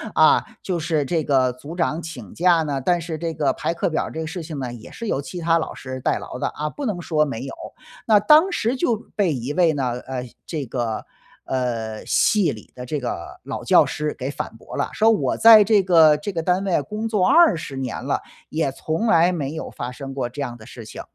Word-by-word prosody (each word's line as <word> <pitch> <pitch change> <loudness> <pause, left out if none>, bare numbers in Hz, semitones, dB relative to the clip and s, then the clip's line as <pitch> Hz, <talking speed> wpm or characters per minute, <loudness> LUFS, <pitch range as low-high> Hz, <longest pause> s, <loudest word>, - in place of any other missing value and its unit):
啊， - - +5 0.2
就 185 -2 -2
是 155 -3 0
这 160 +1 0
个 130 -3 +2
组 145 +6 -9
长 165 -1 0
请 130 - -9
假 175 -1 +4
呢， 140 -3 -2
但 175 +5 +2
是 165 -1 -5
这 165 0 -3
个 145 -4 +1
排 170 - -2
课 170 - -1
表 160 - 0
儿 - - -7
这 160 - -6
个 160 - -3
事 165 +1 -5
情 155 -3 -6
呢， 125 -2 -4
也 115 - -11
是 230 - -7
由 140 - 0
其 175 +5 -7
他 165 0 +3
老 165 - -3
师 130 0 -7
代 - - 0
劳 - - -8
的， - - 0
啊， 150 +1 -4
不 285 - -6
能 200 -7 -2
说 155 -2 +1
没 135 -4 -4
有。” 135 - -6 0.5
那 215 -2 +5
当 310 - +5
时 230 - 0
就 255 -4 +1 0.2
被 190 -6 +2
一 130 +2 -4
位 170 0 +4
呢 130 -4 -1
呃， 125 -1 -5 0.2
这 155 -5 -4
个， 115 -2 -3 0.4
呃， 115 -4 -3
系 200 -8 +3
里 110 -4 -11
的 125 - -7
这 145 +3 -2
个 120 -9 -5
老 - - -5
教 - - +5
师 150 0 -2
给 130 +1 -3
反 115 - -6
驳 - - -10
了， - - -1
说 220 +1 +4
我 215 - +1
在 225 -2 +9
这 205 -1 +4
个 165 -4 +6
这 200 +7 -5
个 165 - -2
单 180 +2 +1
位 185 -6 +1
工 215 +8 -4
作 210 -5 +1
20 245 - +4
年 130 -1 -4
了， - - 0 0.3
也 155 -3 -1
从 160 - -2
来 175 -3 +5
没 150 -5 -3
有 160 - -5
发 120 +1 -5
生 135 +2 -8
过 135 -2 -2
这 145 +4 -7
样 120 -3 -5
的 110 - -14
事 120 -4 -10
情。 - - -8
155 Hz, 255 characters per minute, -22 LUFS, 130-180 Hz, 0.5 s, 在